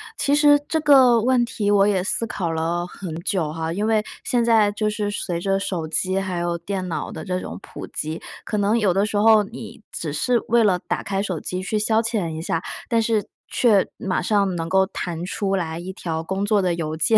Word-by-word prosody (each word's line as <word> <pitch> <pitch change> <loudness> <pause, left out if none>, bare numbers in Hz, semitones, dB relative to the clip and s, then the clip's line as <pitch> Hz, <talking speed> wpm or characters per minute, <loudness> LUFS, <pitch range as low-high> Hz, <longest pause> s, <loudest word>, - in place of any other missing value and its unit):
其 285 +1 +2
实 290 -1 +6
这 320 - +1
个 260 -5 +6
问 250 0 +3
题 210 -4 -1
我 200 -1 +5
也 190 -3 +1
思 230 +3 -1
考 175 -6 -3
了 165 +2 -1
很 180 -2 -7
久 175 -5 -1
哈。 160 +1 -3
因 205 +4 -1
为 220 -1 +2 0.2
现 240 -2 +1
在 220 -3 +4
就 210 0 -1
是 210 -1 -2
随 180 -4 -3
着 195 +1 +1
手 175 -5 -3
机 185 +4 0
还 190 -2 -3
有 175 0 -1
电 185 +2 -4
脑 170 - -4
的 - - -7
这 185 -2 -1
种 - - -7
普 - - -9
及， 155 +2 -4 0.2
可 210 - -2
能 205 +3 +2
有 205 -5 +2
的 195 +3 +2
时 210 - -2
候 220 0 +6
你 220 +1 -10
只 155 -3 -4
是 240 +10 +1
为 235 0 +4
了 195 -4 +3
打 - - -1
开 195 0 -2
手 185 -5 -3
机 185 +4 -4
去 210 +2 -1
消 220 +1 +2
遣 220 -6 -1
一 160 0 -5
下， 165 -1 -1 0.3
但 230 -2 +2
是 220 -2 +1 0.2
却 215 -6 +3
马 190 -2 -1
上 200 -1 +1
能 165 -1 -3
够 190 +1 +4
弹 175 -2 -5
出 195 +1 -1
来 165 -3 -3
一 180 +2 -6
条 165 -3 -4
工 190 +4 -2
作 205 -1 +3
的 180 -2 +1
邮 160 -2 -3
件， 220 +8 +4
195 Hz, 245 characters per minute, -22 LUFS, 175-220 Hz, 0.3 s, 实